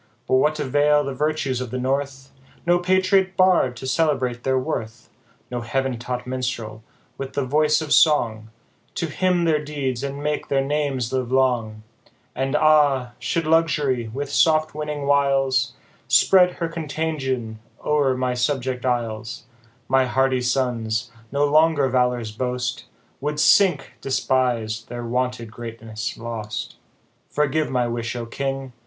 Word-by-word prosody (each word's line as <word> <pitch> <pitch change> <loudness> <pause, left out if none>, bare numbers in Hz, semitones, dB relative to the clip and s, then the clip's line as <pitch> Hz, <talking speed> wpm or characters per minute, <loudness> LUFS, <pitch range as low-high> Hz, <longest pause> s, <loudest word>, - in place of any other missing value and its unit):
But 130 - +3
what 150 +3 +2
avail 145 +1 +3
the 140 -1 -4
virtues 140 -3 -1
of 125 - -4
the 130 - -4
North, 135 +1 -2 0.3
No 175 +1 +3
Patriot 185 +1 +2
Bard 185 -9 +4
to 130 - -7
celebrate 130 -5 0
their 130 0 +1
worth, 120 -4 -4 0.4
No 120 -1 -3
heav'n 130 +1 -2
taught 125 0 -4
Minstrel, 125 -4 -4 0.4
with 135 -1 -5
the 140 - -1
voice 150 +3 +2
of 150 - 0
song, 115 -8 +3 0.5
To 170 - -1
hymn 180 +2 +1
their 155 -3 +2
deeds, 135 -4 -3
and 140 +1 -4
make 150 0 -2
their 135 -1 +1
names 140 -4 -1
live 130 -2 -1
long? 120 -5 +1 0.5
And, 135 +2 -1
ah! 145 -5 +4
should 165 -1 -1
luxury, 150 -7 +1
with 140 +5 -5
soft 155 0 +3
winning 150 -1 -4
.viles, 135 -2 +2 0.3
Spread 180 -2 +5
her 170 - -3
contagion 145 -8 -3 0.3
o'er 145 -4 +2
my 125 -1 0
subject 125 0 -1
isles, 115 -3 -2 0.4
My 130 0 +3
hardy 130 0 +1
sons, 120 -3 -1 0.2
no 145 +1 +2
longer 155 -1 +3
valour's 125 -3 0
boast, 125 +2 -3 0.3
Would 150 +2 -3
sink, 165 -6 +4
despis'd, 120 -4 0
their 120 0 -5
wonted 125 -1 -2
greatness 115 -2 -6
lost. 115 -2 -6 0.5
Forgive 150 +1 0
my 125 -2 +1
wish, 115 0 -3
O 120 -1 -4
king 135 +1 -4
130 Hz, 140 wpm, -22 LUFS, 125-150 Hz, 0.5 s, Spread